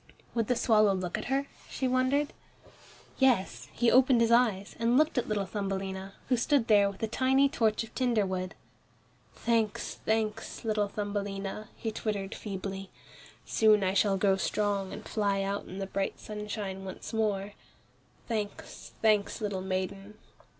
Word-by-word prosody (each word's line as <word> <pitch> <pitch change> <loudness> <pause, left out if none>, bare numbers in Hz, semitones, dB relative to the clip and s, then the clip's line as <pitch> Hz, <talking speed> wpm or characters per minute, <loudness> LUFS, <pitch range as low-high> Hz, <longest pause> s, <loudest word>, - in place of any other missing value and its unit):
"Would 230 -3 0
the 250 - +2
swallow 215 -4 +4
look 180 -2 -3
at - - -4
her," 270 +2 0 0.2
she 260 - -1
wondered. 255 +3 +1 0.9
Yes, 255 -8 +2
he 240 -1 +2
opened 255 -1 +6
his 230 0 +3
eyes, 220 -5 +3
and 235 +2 +3
looked 310 +2 +3
at - - -3
little 210 -2 0
Thumbelina, 195 0 -4
who 250 - +2
stood 270 0 +2
there 205 -2 +5
with 200 +2 -9
a - - +2
tiny 265 +4 +3
torch 225 -5 +1
of 225 - -12
tinder 240 -5 +2
wood. 185 -1 -3 0.8
"Thanks, 225 -3 -1
thanks, 220 +1 -1
little 210 -2 +1
Thumbelina," 205 0 -4
he 225 - -3
twittered 210 -2 -3
feebly. 195 -1 -5 0.6
"Soon 215 -2 +4
I 190 0 +1
shall 200 0 +3
grow 195 0 +3
strong 200 0 0
and - - -8
fly 200 -2 0
out 200 +1 -3
in 185 - -8
the 195 - -2
bright 195 0 -2
sunshine 210 -2 -5
once 190 +4 -7
more; 205 -2 0 0.7
thanks, 215 -3 -5
thanks, 210 -2 +3
little 205 -3 -2
maiden." 190 +2 -4
210 Hz, 155 wpm, -30 LUFS, 195-230 Hz, 0.9 s, opened